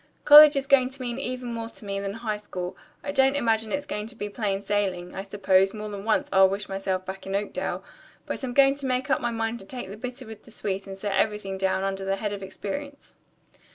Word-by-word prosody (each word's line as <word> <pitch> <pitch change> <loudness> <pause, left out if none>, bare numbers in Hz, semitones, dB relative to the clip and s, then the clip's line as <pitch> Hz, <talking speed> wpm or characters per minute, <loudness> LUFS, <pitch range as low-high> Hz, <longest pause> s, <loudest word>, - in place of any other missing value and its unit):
"College 300 0 +10
is 275 -1 0
going 265 -2 +4
to 270 0 -9
mean 240 +1 -3
even 250 -2 -4
more 230 0 -4
to 220 - -14
me 195 0 -2
than 200 0 -3
high 225 -1 -3
school. 185 -4 -6 0.3
I 285 - -3
don't 270 0 +3
imagine 225 -5 +1
it's 285 0 -1
all - - -26
going 210 -5 -3
to 240 - -8
be 205 -2 -4
plain 200 -2 -1
sailing. 195 -3 -2
I 190 - -4
suppose, 195 0 +2
more 215 0 -5
than 200 -1 -7
once, 225 - +2
I'll 190 0 +7
wish 200 +2 -3
myself 195 -1 -2
back 190 0 -7
in 195 - -2
Oakdale, 205 +1 -2 0.4
but - - -5
I'm 245 -2 -3
going 275 -1 +6
to 280 -1 -5
make 255 +1 -1
up 265 - +2
my 240 - 0
mind 225 0 -2
to 195 - -11
take 250 -4 -6
the 205 - -8
bitter 250 +3 -7
with 220 -1 -11
the - - -15
sweet 195 -3 -4
and 195 0 -7
set 200 0 -2
everything 210 -3 0
down 190 0 0
under 195 0 -2
the 195 0 0
head 205 +1 -3
of 200 - -6
experience." 245 +9 -7
210 Hz, 250 wpm, -26 LUFS, 195-250 Hz, 0.4 s, College